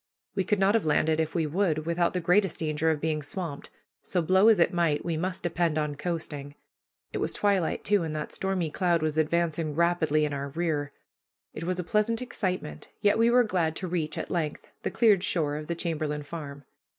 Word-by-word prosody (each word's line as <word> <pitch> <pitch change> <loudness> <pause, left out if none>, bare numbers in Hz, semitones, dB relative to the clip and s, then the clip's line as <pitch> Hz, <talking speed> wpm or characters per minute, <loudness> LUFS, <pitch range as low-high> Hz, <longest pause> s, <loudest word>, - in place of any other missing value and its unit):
We 190 - 0
could 210 - +1
not 195 +1 +3
have 225 - +2
landed 155 +1 +2
if 160 +1 -1
we 165 -2 +1
would, 155 -1 0
without 170 +1 +1
the 180 - 0
greatest 180 +1 +2
danger 155 0 0
of 155 -2 +1
being 155 0 -1
swamped; 150 0 -5 0.3
so 185 - -1
blow 190 +5 +4
as 220 -4 +6
it 170 - +3
might, 165 -4 +1
we 170 -2 -1
must 180 +3 -3
depend 170 -2 0
on 150 -1 0
coasting. 145 -3 -4 0.6
It - - -2
was - - -1
twilight, 200 -5 0
too, 205 -2 +3
and 160 -2 -3
that 150 -1 -4
stormy 190 -5 -2
cloud 175 -3 +1
was 155 0 0
advancing 160 -1 0
rapidly 160 -3 +2
in 145 - -3
our 140 0 -3
rear. 150 -2 -2 0.6
It 160 - -6
was 180 +1 -1
a - - -1
pleasant 215 +4 +1
excitement, 185 - -4
yet 205 +1 +3
we 230 +1 +5
were 245 +1 +5
glad 175 -7 0
to 185 - -4
reach, 165 -3 -2
at - - -4
length, 155 -4 -3
the - - -1
cleared 210 -6 +4
shore 150 -7 0
of 150 0 -6
the 170 - -2
Chamberlain 155 -3 -2
Farm. 145 -3 -8
165 Hz, 210 wpm, -27 LUFS, 155-185 Hz, 0.6 s, as